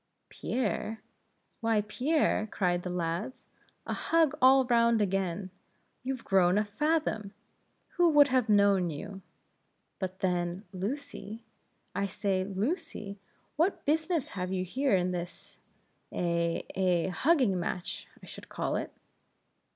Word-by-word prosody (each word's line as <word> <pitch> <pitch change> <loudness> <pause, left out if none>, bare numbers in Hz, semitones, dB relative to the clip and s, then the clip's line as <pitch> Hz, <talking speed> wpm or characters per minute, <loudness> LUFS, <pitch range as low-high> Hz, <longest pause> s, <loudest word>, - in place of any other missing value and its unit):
"Pierre? 225 -2 -2 0.6
why, 225 -2 +2
Pierre?" 250 +2 +1
cried 180 -3 0
the 180 - -5
lads 180 +9 -3 0.4
"a - - -2
hug 325 -4 +2
all 260 +1 +7
round 235 -2 +4
again! 190 -2 -1 0.5
You've 260 -1 -4
grown 185 -1 +4
a 210 - +3
fathom! 215 -2 -1 0.6
who 350 -1 +5
would 290 -2 +6
have 255 -3 +2
known 200 -3 +4
you? 195 +6 -7 0.8
But, 190 0 -5
then 180 0 -1
Lucy? 225 +1 -5 0.5
I 200 0 0
say, 190 -1 -1
Lucy? 200 - -3 0.4
what 340 +6 +1
business 320 0 +1
have 185 -1 -4
you 185 -1 -1
here 260 +4 +1
in 180 0 +1
this 175 0 -7 0.5
eh? 170 -1 0
eh? 180 -2 +1
hugging 250 - +2
match, 175 +1 -4 0.2
I - - -9
should - - -11
call - - -1
it?" - - -4
205 Hz, 125 wpm, -30 LUFS, 185-255 Hz, 0.8 s, all